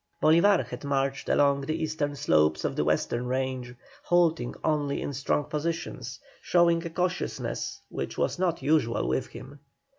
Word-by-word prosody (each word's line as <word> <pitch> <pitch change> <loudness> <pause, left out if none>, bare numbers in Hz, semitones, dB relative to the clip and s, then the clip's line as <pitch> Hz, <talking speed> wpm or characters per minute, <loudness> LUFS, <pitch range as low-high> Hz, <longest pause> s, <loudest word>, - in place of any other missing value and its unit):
Bolívar 170 +5 +4
had - - -8
marched 135 -1 -1
along 140 -1 +3
the 155 +3 -2
eastern 155 -2 -2
slopes 80 - +2
of - - -1
the - - +1
western 120 +11 0
range, 130 -1 -2 0.3
halting 165 -7 +2
only 145 -3 0
in 145 - -4
strong 140 +2 0
positions, 160 +3 -4 0.2
showing 170 -1 +3
a 170 - -4
cautiousness 180 +2 -3
which - - -5
was - - 0
not 180 -3 0
usual 145 -6 +2
with 130 - 0
him. 140 +2 -11
145 Hz, 150 wpm, -27 LUFS, 130-165 Hz, 0.3 s, Bolívar